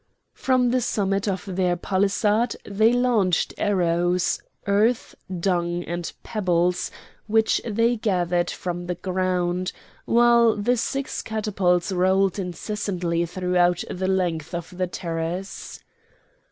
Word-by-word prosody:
From 255 -2 +2
the 255 0 +2
summit 195 -2 0
of 190 -1 -2
their 180 -2 +1
palisade 205 +5 +1
they 215 +3 +3
launched 240 -8 +2
arrows, 175 -2 +1 0.2
earth, 215 +4 +2 0.3
dung, 175 -1 0
and 175 0 -4
pebbles 180 -4 0 0.4
which 220 +1 +2
they 230 +2 +1
gathered 180 -5 0
from 175 -1 -4
the 180 - -2
ground, 185 0 -1 0.3
while 235 -1 +5
the 220 +4 +1
six 270 +3 -2
catapults 195 -5 0
rolled 190 +1 +2
incessantly 180 -2 -2
throughout 180 0 +1
the 185 +1 -2
length 175 -3 -1
of 175 +1 -6
the 185 0 -1
terrace. 175 +2 -5
185 Hz, 115 wpm, -24 LUFS, 175-210 Hz, 0.4 s, while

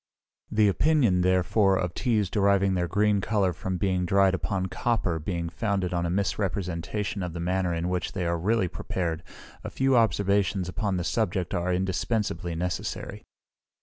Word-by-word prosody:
The 105 -1 +3
opinion, 115 - +3
therefore, 95 +2 +3
of 90 -2 -2
teas 110 -4 +1
deriving 100 -1 +3
their 90 -1 0
green 105 +1 +2
colour 100 -3 +1
from 95 +1 -3
being 95 -1 0
dried 95 +1 +3
upon 95 0 -1
copper 95 -5 -1
being 85 +1 -3
founded 90 +1 -1
on 85 -1 0
a - - -2
misrepresentation 95 0 -2
of 90 -2 -4
the 85 - -5
manner 90 +1 0
in 85 +1 -1
which 90 -2 -2
they 90 -3 -2
are 85 0 0
really 105 +2 +1
prepared, 85 -2 -3 0.4
a - - -4
few 135 0 +1
observations 100 -3 +2
upon 100 +1 -1
the 90 - -2
subject 95 -3 -1
are 90 +1 0
indispensibly 95 0 -1
necessary. 90 +2 -4
95 Hz, 160 wpm, -27 LUFS, 90-100 Hz, 0.4 s, The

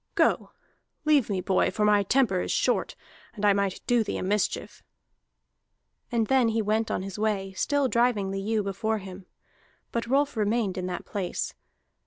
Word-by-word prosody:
"Go, - - +2 0.6
leave 295 -7 +4
me, 190 -3 -1
boy, 190 +1 +2
for 210 - 0
my 210 -1 +5
temper 200 -3 +2
is - - -3
short, - - +1 0.4
and 210 -1 -2
I 205 - +6
might 200 -1 -1
do 240 -2 +3
thee - - -3
a - - -3
mischief!" 205 +2 -1 1.3
And 230 -2 +2
then 260 0 +3
he 225 0 0
went 220 +2 0
on - - -2
his 195 +1 -7
way, 200 -3 -1
still 285 +7 +1
driving 235 -5 +1
the 195 0 -3
ewe 215 +1 0
before 215 +3 -1
him; 190 -2 -10 0.6
but 235 0 -2
Rolf 280 +2 +1
remained 210 -2 0
in 185 -1 -3
that 180 - -5
place. 190 -4 -3
210 Hz, 175 wpm, -27 LUFS, 195-235 Hz, 1.3 s, I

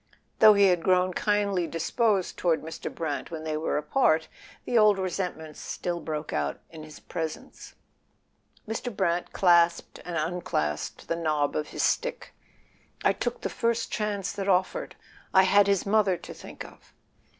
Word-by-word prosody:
Though 215 -1 +8
he 200 -1 +5
had 175 -2 +2
grown 185 +1 +2
kindly 200 -3 0
disposed 190 +5 0
toward 165 -3 0
Mr. 160 +1 -6
Brant 155 -4 -4
when 160 -2 -6
they 155 -1 -2
were 155 0 -1
apart, 160 - +2 0.4
the 245 - -2
old 215 -3 +6
resentments 180 -4 -4
still 175 -1 -4
broke 155 -2 -5
out 75 -1 -2
in 160 -1 -10
his 155 0 -11
pres¬ 160 -2 -4
ence. - - -15 0.9
Mr. 225 +3 -3
Brant 170 +1 0
clasped 170 -2 +3
and 175 -2 -4
unclasped 155 - -2
the 165 - 0
knob 155 -3 0
of 150 - -1
his - - -3
stick. - - -1 0.7
"I - - +4
took - - -3
the - - -1
first 230 0 -1
chance 205 -3 -2
that 200 -1 -3
offered; 195 - 0 0.4
I 190 - +8
had 200 +1 +5
his 200 -2 +1
mother 200 -3 +2
to - - -10
think - - -10
of." - - -17
180 Hz, 160 wpm, -27 LUFS, 160-200 Hz, 0.9 s, Though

